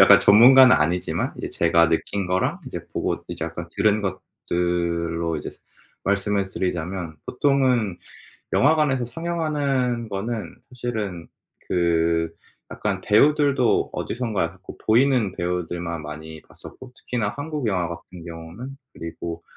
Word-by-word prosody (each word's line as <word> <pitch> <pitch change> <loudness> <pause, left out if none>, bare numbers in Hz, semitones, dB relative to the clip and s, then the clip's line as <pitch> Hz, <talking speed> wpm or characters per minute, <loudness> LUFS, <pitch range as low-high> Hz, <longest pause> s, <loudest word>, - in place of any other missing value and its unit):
약간 100 +1 +8
전문가는 125 +5 +8
아니지만 85 +4 0
이제 - - -4
제가 85 -1 +3
느낀 90 +4 -1
거랑 90 +1 0
이제 - - -6
보고 - - -2
이제 - - -4
약간 - - -6
들은 105 0 +2
것들로 85 -3 -2
이제 75 - -5 0.6
말씀을 100 0 0
드리자면 90 -2 -3
보통은 125 -8 +1 0.5
영화관에서 145 -3 +3
상영하는 140 -6 -1
거는 110 +3 -4
사실은 110 -8 -4 0.4
그 85 -1 +1 0.4
약간 - - -2
배우들도 140 +2 +3
어디선가 115 -5 -2
약간 85 +3 -3
보 - - -8
보이는 120 -3 +3
배우들만 85 -2 -3
많이 80 +1 -8
봤었고 130 -1 -13
특히나 115 -5 -3
한국 145 -2 -3
영화 90 -5 0
같은 85 +1 -9
경우는. 85 +11 -8 0.2
그리고 85 0 -6
100 Hz, 300 characters per minute, -23 LUFS, 85-125 Hz, 0.6 s, 약간